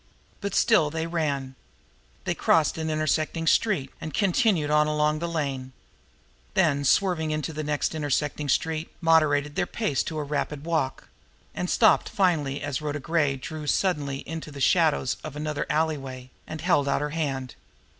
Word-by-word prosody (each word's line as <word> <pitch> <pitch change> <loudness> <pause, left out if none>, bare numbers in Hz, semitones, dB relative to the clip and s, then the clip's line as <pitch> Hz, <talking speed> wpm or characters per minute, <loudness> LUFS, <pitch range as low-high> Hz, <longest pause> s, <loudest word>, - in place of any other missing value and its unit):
But 200 -1 -3
still 195 -10 +4
they 160 +1 -3
ran. 145 -6 -2 0.7
They - - 0
crossed 160 0 +2
an 160 0 -2
intersecting 155 +1 0
street, 160 -6 +2
and 155 -3 -5
continued 190 -6 +2
on 150 0 +4
along 150 0 +1
the 170 - -2
lane; 135 -5 -3 0.8
then 155 -6 +3
swerving 170 0 +2
into 155 0 -2
the 155 +1 -4
next 150 +1 -1
intersecting 145 -1 -1
street, 160 +3 0
moderated 150 -3 +3
their - - 0
pace 210 - -1
to 160 - -4
a 150 - -1
rapid 145 0 -3
walk 160 -6 -1 0.5
and 180 - -3
stopped 220 - +4
finally 165 -8 +1
only - - -6
as 145 -1 -2
Rhoda 150 -1 -3
Gray 145 -1 +1
drew 150 +3 -7
suddenly 145 -7 0
into 160 -1 -6
the 140 - -9
shadows 155 -4 +2
of 155 -2 -7
another 150 0 -3
alley 155 0 +1
way, 130 -1 -9 0.2
and 155 -1 -6
held 160 -5 +2
out 140 - +1
her 150 0 -2
hand. 135 -6 -3
150 Hz, 165 wpm, -26 LUFS, 145-165 Hz, 0.8 s, still